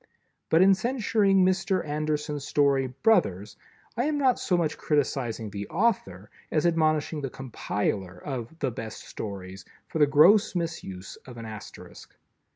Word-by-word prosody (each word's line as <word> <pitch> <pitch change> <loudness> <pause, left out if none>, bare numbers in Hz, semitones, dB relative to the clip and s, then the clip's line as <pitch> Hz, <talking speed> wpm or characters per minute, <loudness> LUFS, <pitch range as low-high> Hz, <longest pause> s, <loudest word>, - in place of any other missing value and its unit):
But 165 +3 +5
in 195 +1 +6
censuring 210 -3 +2
Mr. 185 0 +1
Anderson's 150 -1 -2
story 140 -2 +2
"Brothers," 125 - +1 0.4
I 240 +3 0
am 300 0 0
not 265 -3 +2
so 180 - +1
much 160 -3 0
criticizing 125 -7 -1
the 100 0 -5
author 105 - -1 0.2
as 155 +1 +1
admonishing 155 -2 +1
the 135 - -3
compiler 105 -7 -3
of 130 - -6
"The 135 -5 -1
Best 115 -2 -7
Stories" 95 -2 -7 0.2
for 160 - -4
the 150 - +6
gross 175 +9 +5
misuse 160 - -5
of 125 -2 -10
an 115 - -7
Asterisk. 110 -1 -11
150 Hz, 145 wpm, -27 LUFS, 115-185 Hz, 0.4 s, in